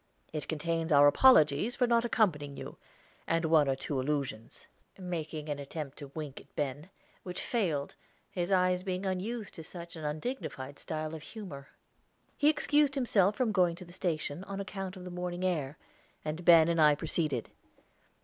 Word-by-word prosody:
It 150 - -3
contains 165 +1 -1
our 145 -1 +7
apologies 160 - +5
for 250 - +3
not 235 -1 +3
accompanying 150 - +1
you, - - -8 0.5
and 165 0 +1
one 155 -2 +5
or 135 - +2
two 135 +1 -3
allusions," 135 -5 -3 0.3
making 160 -4 -5
an 145 -1 -3
attempt 145 0 -6
to 140 -2 -9
wink 150 -4 -6
at - - -24
Ben, 145 +4 -3 0.3
which 180 -1 -6
failed, 165 - -1 0.4
his 175 +1 -2
eyes 180 -1 +3
being 185 0 -3
unused 205 +3 -3
to 160 - -8
such 170 +1 -8
an 160 - -8
undignified 150 - -4
style 155 0 -4
of 160 - -6
humor. 155 -8 -9 0.7
He 295 - +4
excused 295 -2 +2
himself 210 -7 +3
from 245 -2 +1
going 180 -4 +3
to 180 +1 -10
the 175 - -14
station 170 -2 -2
on 195 0 -5
account 195 -1 -5
of 180 - -9
the 180 - -7
morning 180 0 -4
air, 150 -6 -1 0.5
and 155 +3 -3
Ben 165 -2 +8
and 165 -1 +2
I 150 -1 +6
proceeded. 150 -5 -2
170 Hz, 170 wpm, -31 LUFS, 150-190 Hz, 0.7 s, Ben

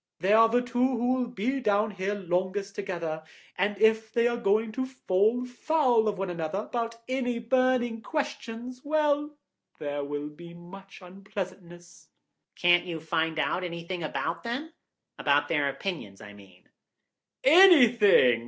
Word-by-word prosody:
They 190 +3 +2
are 225 +1 +6
the 245 +2 +2
two 245 0 -4 0.2
who 245 +2 +1
will 255 -1 -1
be 245 +3 -2
down 210 -2 +1
here 195 +1 -3
longest 190 +1 -2
together, 170 -6 -4 0.3
and 205 0 -1
if 220 0 +3
they 235 +1 +2
are 240 - 0
going 220 0 +1
to 260 +4 -3
fall 230 -1 0
foul 250 -2 +1
of 205 -2 -1
one 190 -1 -3
another 165 +1 -3
about 230 0 -4
any 255 -2 -1
burning 240 -1 +1
question, 255 -5 -4
well, 295 0 0 0.4
there 145 -1 -4
will 145 +1 -4
be 170 +3 -13
more 185 +3 -12
unpleasantness." 185 -2 -9 0.5
"Can't 175 0 +3
you 165 -2 -4
find 160 0 -1
out 180 +3 -1
anything 170 +1 -5
about 165 +1 -3
them? 270 +8 -5 0.5
About 145 0 +2
their 145 -3 +1
opinions, 140 - -6
I 105 - -11
mean." 95 -3 -18 0.8
"Anything? 245 - +6
205 Hz, 145 wpm, -27 LUFS, 175-245 Hz, 0.8 s, are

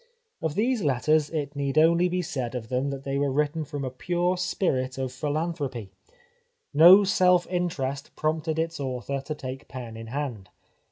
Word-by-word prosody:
Of 160 -2 -2
these 240 +2 +1
letters 150 +1 +2
it 150 -2 -3
need 140 0 -2
only 170 +3 +5
be 180 0 -1
said 130 -5 -4
of 110 -3 -5
them 130 +2 0
that 135 -1 -5
they 140 0 -2
were 140 -1 +1
written 150 +3 0
from 145 -2 -5
a 130 - -4
pure 175 +7 0
spirit 130 -8 -1
of 130 -1 -2
philanthropy. 145 - -3 0.8
No 175 +7 +9
self 180 -3 +4
interest 145 -6 -3
prompted 155 +1 -1
its 165 0 -2
author 135 0 -3
to 150 +3 -5
take 130 -1 -7
pen 120 -4 -8
in 115 0 -8
hand. 125 -6 -4
145 Hz, 170 wpm, -26 LUFS, 130-165 Hz, 0.8 s, No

